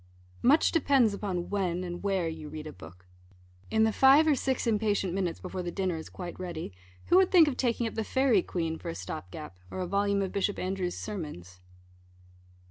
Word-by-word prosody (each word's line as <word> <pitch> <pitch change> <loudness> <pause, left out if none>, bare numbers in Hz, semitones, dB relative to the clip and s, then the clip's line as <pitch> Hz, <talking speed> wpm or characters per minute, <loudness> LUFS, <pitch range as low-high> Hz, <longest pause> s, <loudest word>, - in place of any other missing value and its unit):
Much 290 +6 +4
depends 275 - +3
upon 190 -4 -3
when 185 -3 -1
and 175 -1 -5
where 195 -4 0
you 160 -2 -6
read 155 0 -7
a 155 - -7
book. 90 +1 -14 0.6
In 220 0 +3
the 220 -1 +2
five 270 +6 +6
or 310 - +4
six 265 -1 -1
impatient 210 -5 +1
minutes, 180 -3 -2
before 185 0 -5
the 175 - -4
dinner 185 -1 -1
is 160 - -7
quite 175 -1 -8
ready, 170 - -5 0.4
who 355 - +6
would 380 -1 +5
think 340 -4 +7
of 280 - -1
taking 240 -2 0
up 225 - -3
the 220 - -2
Fairy 260 -3 +3
Queen 165 -2 -3
for - - -6
a 85 - -4
stop 90 0 -6
gap, 95 -5 -9
or - - -6
a 185 - -1
volume 200 +2 +1
of 190 - -3
Bishop 200 0 -1
Andrewes' 185 -1 -2
sermons? 150 - -7
190 Hz, 205 wpm, -29 LUFS, 170-220 Hz, 0.6 s, think